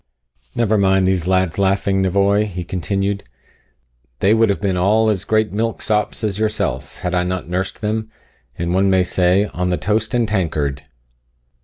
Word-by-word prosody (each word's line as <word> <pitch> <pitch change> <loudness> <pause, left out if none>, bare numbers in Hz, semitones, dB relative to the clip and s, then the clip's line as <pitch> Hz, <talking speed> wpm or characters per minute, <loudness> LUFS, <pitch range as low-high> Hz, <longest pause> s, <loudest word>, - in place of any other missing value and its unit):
"Never 110 -2 +2
mind 95 -1 +3
these 90 -2 0
lads 95 -1 +1
laughing, 95 0 +1
nevoy," 100 +2 +2
he 90 -3 -5
continued; 100 +2 -2 0.9
"they 100 +9 +3
would 115 -1 +3
have 100 - 0
been 100 -2 0
all 110 +5 +3
as 100 -1 -3
great 110 -1 +1
milksops 110 0 -1
as 105 -1 -2
yourself, 110 0 -2
had 90 0 -2
I 90 - +2
not 90 0 -3
nursed 95 +3 -3
them, 110 +1 -2 0.5
as 85 - -3
one 95 +3 +2
may 95 -1 +3
say, 90 +2 +2
on 90 0 -1
the 90 - 0
toast 110 +5 -1
and 120 -2 +2
tankard." 75 -9 -1
95 Hz, 165 wpm, -19 LUFS, 90-105 Hz, 0.9 s, mind